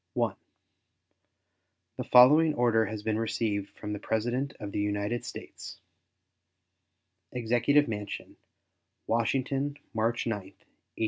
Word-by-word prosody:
The - - -9
following 150 +5 +7
order 115 -2 +3
has 110 -1 -6
been 110 0 0
received 110 -3 -1
from 105 0 -5
the 105 - -4
President 120 +7 -1
of 105 -2 -6
the - - -2
United 105 +3 -1
States: - - -9 1.6
EXECUTIVE 125 +5 +2
MANSION, 105 -2 -5 0.7
Washington, 135 +5 0 0.2
March 115 +1 0
9, 115 -3 0
1874. 95 0 -17
115 Hz, 105 wpm, -29 LUFS, 105-125 Hz, 1.6 s, following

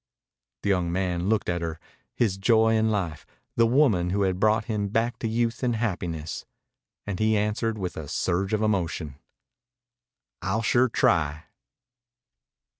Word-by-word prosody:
The - - 0
young 90 -3 +1
man 90 0 -1
looked 110 -2 +1
at 85 -1 -1
her, 80 -1 -4 0.4
his 105 -6 +1
Joy 110 +2 +4
in 110 0 +2
life, 90 -8 -2 0.3
the 115 0 +4
woman 115 -9 +3
who 100 +2 +1
had 95 -1 0
brought 110 +1 +3
him 105 -3 -1
back 115 +4 -1
to 115 - -2
youth 115 +1 -1
and 125 -2 +1
happiness, 90 -8 -3 0.6
and 100 -3 -4
he 110 0 +3
answered 110 +2 -1
with 95 -3 -4
a 75 - -6
surge 95 +7 -1
of 110 0 +1
emotion: 85 -8 -1 1.2
"I'll 95 +5 -1
sure 125 +2 +3
try." 80 -7 +1
100 Hz, 150 wpm, -26 LUFS, 90-110 Hz, 1.2 s, Joy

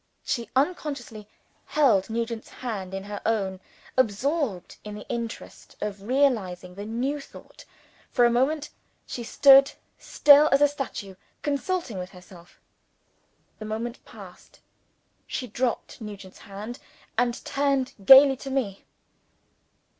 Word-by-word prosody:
She 235 -4 -3
unconsciously 265 - -2 0.4
held 230 -11 +3
Nugent's 230 0 -3
hand 205 -7 -6
in 195 - -5
her 205 0 -7
own, 195 -4 -1 0.4
absorbed 260 - 0
in 210 -1 -7
the 210 - -10
interest 235 -1 -6
of 205 -1 -4
realizing 205 -8 0
the 200 +2 -7
new 260 +6 -2
thought. - - -14 0.4
For 245 - +3
a 240 - +4
moment, 280 +5 0 0.3
she 240 - -6
stood, 275 +3 +6 0.3
still 295 +1 +6
as 275 - +5
a 290 - +6
statue, 270 -9 -6 0.3
consulting 285 - -2
with 180 0 -6
herself. 180 -2 -16 1.0
The 215 - -7
moment 230 +3 -5
passed, - - -14 0.7
she 255 - -4
dropped 245 -1 -3
Nugent's 200 -3 -9
hand, 210 +3 -8 0.4
and 240 0 +1
turned 275 -2 0
gaily 270 +4 +9
to 270 - -8
me. 245 -8 -3
235 Hz, 125 wpm, -26 LUFS, 205-275 Hz, 1.0 s, gaily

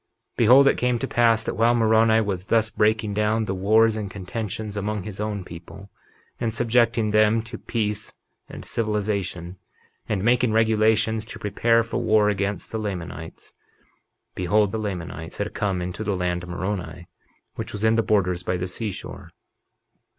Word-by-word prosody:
51:22 - - -46
Behold, 130 +5 +6
it - - +3
came 125 -1 +1
to 135 - -3
pass 115 -3 +3
that - - -3
while 115 +2 +3
Moroni 110 -1 +4
was 95 -3 -3
thus 115 -1 +2
breaking 110 -1 +1
down 105 +2 +1
the 95 - -2
wars 110 +4 +3
and 105 -2 -4
contentions 105 +2 -5
among 105 0 -3
his 105 0 -6
own 105 -2 -3
people, 90 +4 -11 0.5
and 115 -2 -1
subjecting 115 -2 +2
them 110 +1 +3
to 115 +1 -9
peace 105 -2 -3 0.3
and - - -9
civilization, 100 -5 -2 0.5
and 100 -3 -1
making 120 0 +3
regulations 110 0 +2
to - - -9
prepare 115 +3 +2
for 115 - -3
war 110 -1 +3
against 100 0 -2
the 110 - -3
Lamanites, 90 -5 -6 0.8
behold, 100 +3 +1
the 110 - -3
Lamanites 90 -6 -5
had 105 0 -3
come 95 -4 -1
into 90 +4 -5
the 100 -3 -1
land 90 -1 -1
of 90 - -9
Moroni, 90 -1 -4 0.5
which - - -6
was 105 +1 -3
in 110 - +4
the 115 - +3
borders 90 -5 +1
by 90 0 -2
the 90 - -3
seashore. 100 +2 -6
105 Hz, 165 wpm, -24 LUFS, 95-110 Hz, 0.8 s, Behold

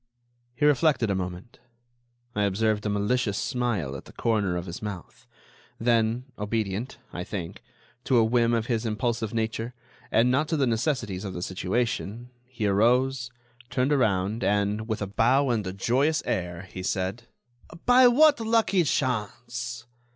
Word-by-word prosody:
He 145 - +1
reflected 145 -6 +3
a - - +1
moment. 90 +3 -6 0.7
I 105 - -1
observed 105 +2 +1
a - - 0
malicious 105 +1 0
smile 115 - -1
at 65 - -8
the - - -13
corner 105 -6 0
of 90 - -4
his 85 -1 -7
mouth; 100 -5 -8 0.5
then, 115 +1 +1
obedient, 105 +2 -2 0.2
I 90 - -4
think, 90 -4 -6 0.4
to 130 - +3
a 115 - +6
whim 115 +1 +2
of 115 -1 0
his 120 -3 -1
impulsive 115 0 -1
nature, 115 +1 -2 0.4
and 120 +3 +4
not 145 +4 +2
to 160 - 0
the 140 - +2
necessities 115 -5 -1
of 95 -2 -5
the 90 - -4
situation, 115 +4 -2 0.2
he 120 -4 -4
arose, 125 +5 +2 0.4
turned 125 +3 +1
around, 105 -5 +1
and, 105 +2 0
with 110 -2 -2
a - - -3
bow 125 +6 +3
and 110 -5 -1
a - - -2
joyous 130 +11 +1
air, 90 -1 -2
he 95 - -6
said: 95 +5 -2 0.6
"By 250 +1 +7
what 290 +3 +5
lucky 225 -5 +2
chance? 120 -2 -2
115 Hz, 155 wpm, -26 LUFS, 100-125 Hz, 0.7 s, By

